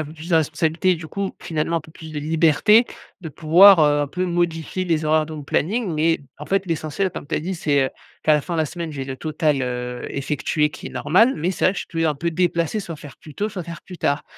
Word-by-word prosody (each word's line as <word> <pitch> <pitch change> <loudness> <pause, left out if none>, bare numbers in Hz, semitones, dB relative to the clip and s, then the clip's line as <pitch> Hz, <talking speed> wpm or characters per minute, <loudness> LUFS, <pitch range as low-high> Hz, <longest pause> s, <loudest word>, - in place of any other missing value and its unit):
a - - 0
un - - -7
peu 155 - -10
plus 165 +3 -10
de - - +4
responsabilités, 160 +3 +1
du 160 0 -8
coup, 200 +3 -3
finalement 160 +1 -1
un 165 - 0
peu 155 +1 -17
plus 160 -1 -11
de 150 - -4
liberté 165 - +4 0.3
de 165 - -6
pouvoir, 170 +5 +7
heu, 150 -1 +4
un 145 - -1
peu 180 +5 -2
modifier 175 0 -1
les 160 -3 0
horaires 155 0 +2
de 160 - -9
mon 150 -2 -7
planning, 195 - -1
mais 165 +2 +2 0.2
en 150 - -8
fait, 195 -1 0
l'essentiel 165 +3 -1
comme - - -7
tu - - -1
as - - +1
dit: 185 +4 -3
«C'est, 145 -4 +1
heu, - - -2 0.3
qu'à 155 - +5
la 150 - +4
fin 170 +4 -5
de - - -1
la 155 - +1
semaine, 170 +1 -6
j'ai 140 -3 -5
le 135 - -5
total, 155 -3 0
heu, 125 0 -4
effectué, 150 +2 0
qui - - -8
est - - -12
normal» 225 - +3
mais 175 +5 -1
c'est - - +1
vrai, 185 - +2
que - - -4
je - - -5
peux 165 -1 -2
un 155 -2 +1
peu 170 +3 -2
déplacer, 175 +3 0
soit 170 -5 -7
faire 145 -1 -12
plus 150 -3 -14
tôt, 210 +1 -1
soit 185 -4 -6
faire 170 0 -9
plus 180 -3 -11
tard. 145 +1 0
160 Hz, 275 wpm, -22 LUFS, 150-175 Hz, 0.3 s, pouvoir